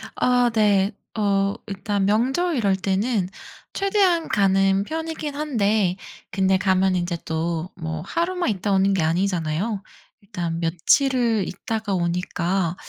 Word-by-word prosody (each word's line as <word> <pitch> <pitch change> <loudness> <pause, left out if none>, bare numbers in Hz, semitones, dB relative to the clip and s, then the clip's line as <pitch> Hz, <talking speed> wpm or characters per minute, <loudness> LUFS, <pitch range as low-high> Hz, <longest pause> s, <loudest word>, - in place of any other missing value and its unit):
아 245 -1 +3
네. 205 -2 +3 0.3
어 200 -1 +1
일단 200 -1 -2
명절 265 - +1
이럴 200 -5 +2
때는 195 +2 0 0.5
최대한 390 -4 +2
가는 195 -1 +3
편이긴 320 +2 -4
한데 215 -10 +1 0.4
근데 190 -1 +2
가면 190 0 +2
인제 175 -1 -1
또 165 +2 -2
뭐 160 -2 -5
하루만 345 - -1
있다 200 -1 -1
오는 195 0 +3
게 190 - +1
아니잖아요. 180 +3 -1 0.4
일단 175 -5 -4
며칠을 225 - +2
있다가 215 +2 -3
오니까 175 0 -1
195 Hz, 245 characters per minute, -23 LUFS, 180-230 Hz, 0.5 s, 아